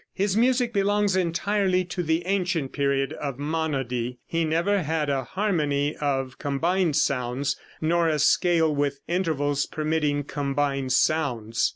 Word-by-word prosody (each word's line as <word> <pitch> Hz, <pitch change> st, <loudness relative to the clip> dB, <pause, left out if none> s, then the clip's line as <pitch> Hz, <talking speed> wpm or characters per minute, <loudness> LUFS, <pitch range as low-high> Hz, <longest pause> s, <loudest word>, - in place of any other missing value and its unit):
His 195 Hz, 0 st, 0 dB
music 245 Hz, +1 st, +2 dB
belongs 205 Hz, -1 st, +2 dB
entirely 185 Hz, +1 st, +1 dB
to 180 Hz, +1 st, -4 dB
the 165 Hz, +1 st, 0 dB
ancient 180 Hz, -7 st, 0 dB
period 140 Hz, -1 st, 0 dB
of 140 Hz, -4 st, -5 dB
monody. 135 Hz, -5 st, -2 dB
He 165 Hz, 0 st, -1 dB
never 170 Hz, +6 st, +1 dB
had 155 Hz, -2 st, -1 dB
a 135 Hz, -1 st, 0 dB
harmony 150 Hz, -5 st, 0 dB
of 135 Hz, -3 st, -2 dB
combined 165 Hz, +4 st, 0 dB
sounds, 135 Hz, +1 st, 0 dB, 0.3 s
nor 170 Hz, +1 st, +2 dB
a 155 Hz, -, +1 dB
scale 160 Hz, +1 st, +3 dB
with 140 Hz, -1 st, -1 dB
intervals 145 Hz, -5 st, 0 dB
permitting 150 Hz, -2 st, -1 dB
combined 140 Hz, -1 st, -1 dB
sounds. 125 Hz, -7 st, +1 dB
155 Hz, 135 wpm, -25 LUFS, 140-180 Hz, 0.3 s, scale